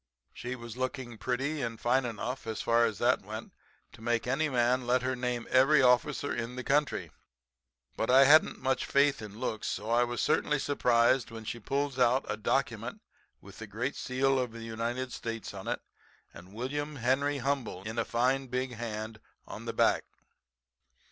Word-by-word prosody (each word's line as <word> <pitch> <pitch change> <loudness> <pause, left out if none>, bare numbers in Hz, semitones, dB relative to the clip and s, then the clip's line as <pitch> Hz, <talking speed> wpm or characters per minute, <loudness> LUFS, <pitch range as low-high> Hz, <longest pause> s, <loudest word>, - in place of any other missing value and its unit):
She 125 +1 -5
was 120 -1 -9
looking 130 -3 -4
pretty 135 +6 -1
and 115 -2 -3
fine 125 +2 +2
enough, 120 +2 -4
as 110 - -3
far 115 0 +4
as 110 - -2
that - - +2
went, - - -7 0.4
to - - -14
make 120 0 0
any 145 +5 +1
man 125 -1 +1
let 125 +1 +2
her 130 0 0
name 125 -1 -2
every 135 +4 +6
officer 130 +3 +3
in 120 +1 -4
the 130 - -5
country. 145 +2 0 0.8
But 110 - -2
I 135 +2 +7
hadn't 155 +3 +6
much 130 0 -1
faith 140 -1 +3
in 105 -1 -9
looks, 110 -4 -3
so 105 +4 -3
I 120 +1 +4
was 120 -1 -3
certainly 150 - +2
surprised 125 -3 +2
when 115 -1 -9
she 120 - -4
pulls 140 +3 -2
out 125 +2 +3
a - - -1
document - - -1 0.4
with - - -13
the - - -7
great - - -3
seal 135 +1 +1
of 125 -3 -2
the 115 0 -8
United 115 +3 -3
States 115 -1 -5
on - - -8
it, - - -2 0.5
and 90 +2 -13
'William 145 +7 -4
Henry 135 +3 +1
Humble' 130 -8 -2
in 110 +3 -4
a - - +2
fine, 130 +4 +1
big 125 +1 -2
hand 110 -1 -5 0.3
on - - -8
the - - -2
back. - - +3
125 Hz, 180 wpm, -30 LUFS, 115-135 Hz, 0.8 s, I